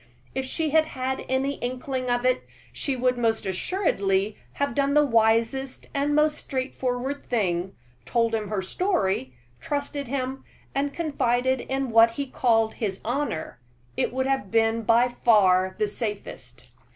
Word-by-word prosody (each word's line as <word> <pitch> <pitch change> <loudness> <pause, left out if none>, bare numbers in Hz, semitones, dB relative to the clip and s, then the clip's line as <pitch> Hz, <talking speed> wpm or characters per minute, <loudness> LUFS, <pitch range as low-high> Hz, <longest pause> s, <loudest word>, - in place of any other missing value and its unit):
If 265 0 -2
she 310 +3 -1
had 315 +1 +5
had 265 -3 -3
any 270 +2 0
inkling 255 +1 -3
of 245 0 +1
it, 255 0 +3 0.3
she 275 - -2
would 250 0 +1
most 225 -2 +1
assuredly 195 - 0 0.2
have 280 -3 -1
done 280 +2 +1
the 295 0 +6
wisest 230 +2 +1
and 290 +1 +1
most 300 0 +3
straightforward 260 +1 -3
thing 190 -5 0 0.3
told 230 - +1
him 215 -2 -1
her 205 -3 -1
story, 190 - 0 0.2
trusted 285 -1 -3
him, 265 +1 -3 0.3
and 280 +1 0
confided 260 -5 0
in 265 -2 -2
what 230 +1 +6
he 280 - -1
called 225 -4 +2
his 195 -4 -3
honor 240 - -2 0.4
it - - 0
would 260 +1 -1
have 270 -7 0
been 225 +1 +2
by 235 +2 +4
far 190 -6 +3
the 210 -1 +1
safest. 165 - -6
245 Hz, 150 wpm, -25 LUFS, 220-275 Hz, 0.4 s, the